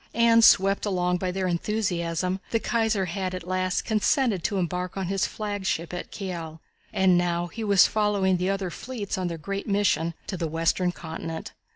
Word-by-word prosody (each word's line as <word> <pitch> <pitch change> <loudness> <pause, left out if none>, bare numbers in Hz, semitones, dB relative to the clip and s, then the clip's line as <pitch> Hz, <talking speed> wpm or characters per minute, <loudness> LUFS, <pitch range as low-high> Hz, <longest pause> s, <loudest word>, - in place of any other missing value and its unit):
And 230 0 +5
swept 195 0 +5
along 180 -2 +1
by 185 +1 -2
their 190 +1 -2
enthusiasm 180 -1 -1
the 230 - +1
Kaiser 220 -4 +1
had 185 +1 -3
at 180 -1 -7
last 185 0 0
consented 220 - +1
to 200 - 0
embark 180 +1 -2
on 190 - -1
his 195 +1 0
flagship 200 -5 -3
at 180 - -5
Kiel, 170 -5 -6 0.3
and 185 -2 +4
now 175 -1 0
he 220 +6 -6
was 200 -3 +6
following 205 -3 +2
the 180 +2 -1
other 195 -2 -1
fleets 225 -3 -5
on 185 -1 -2
their 170 -1 -4
great 195 +5 -5
mission 170 -5 +1
to 190 - -4
the 165 -1 -2
Western 165 +3 +1
Continent. 160 -1 -6
185 Hz, 180 wpm, -26 LUFS, 175-205 Hz, 0.3 s, was